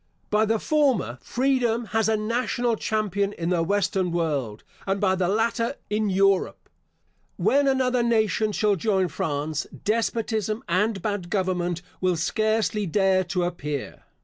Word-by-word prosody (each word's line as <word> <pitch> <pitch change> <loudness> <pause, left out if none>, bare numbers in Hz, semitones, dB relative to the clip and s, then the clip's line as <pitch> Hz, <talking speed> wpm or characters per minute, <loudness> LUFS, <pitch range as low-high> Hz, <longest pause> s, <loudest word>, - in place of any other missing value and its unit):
By 215 +1 +3
the 225 +1 +1
former, 255 - +1
freedom 245 -3 0
has 225 0 +2
a 220 - +2
national 235 +2 0
champion 205 -2 -1
in 170 -2 -3
the 175 -2 +2
western 190 0 0
world; 145 -11 -2 0.2
and 195 +1 0
by 190 -2 +2
the 185 -1 0
latter, 230 +5 0 0.2
in 210 0 +1
Europe. 195 0 +1 0.7
When 280 +1 +3
another 255 -2 +2
nation 220 -2 +1
shall 210 -1 +2
join 190 -1 +1
France, 150 0 -2 0.2
despotism 220 0 -1
and 195 +2 0
bad 205 -5 -2
government 180 -3 -1 0.2
will 185 -1 +2
scarcely 215 +3 0
dare 190 +1 +2
to 180 -1 -1
appear. 150 -5 -4
205 Hz, 140 wpm, -25 LUFS, 180-225 Hz, 0.7 s, By